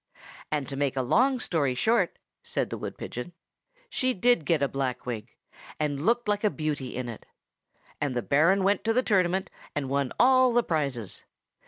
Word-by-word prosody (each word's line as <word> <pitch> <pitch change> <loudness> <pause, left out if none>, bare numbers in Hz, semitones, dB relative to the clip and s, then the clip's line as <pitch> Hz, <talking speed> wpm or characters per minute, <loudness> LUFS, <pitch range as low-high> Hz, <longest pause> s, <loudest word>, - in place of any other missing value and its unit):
And 150 -3 -1
to 140 - -5
make 140 -1 0
a 130 - +1
long 255 - +3
story 145 - 0
short, 210 - +2 0.2
said - - -2
the - - -3
wood - - -6
pigeon, 125 +9 -6 0.5
she 255 - 0
did 240 -4 +3
get 160 -4 +2
a - - +3
black 135 -2 -3
wig, 115 -2 -5 0.4
and 150 +2 -1
looked 240 0 +2
like 205 0 0
a 210 - +4
beauty 150 -7 -3
in 125 0 -3
it. 115 -3 -7 0.8
And 140 -4 -1
the 120 - -1
Baron 165 +7 +3
went 200 +2 +2
to 225 - +2
the 255 +2 +2
tournament, 190 -3 +1 0.2
and 140 -3 -2
won 140 -2 0
all 255 0 +5
the 240 0 +4
prizes. 140 - -2
155 Hz, 185 wpm, -27 LUFS, 135-210 Hz, 0.8 s, all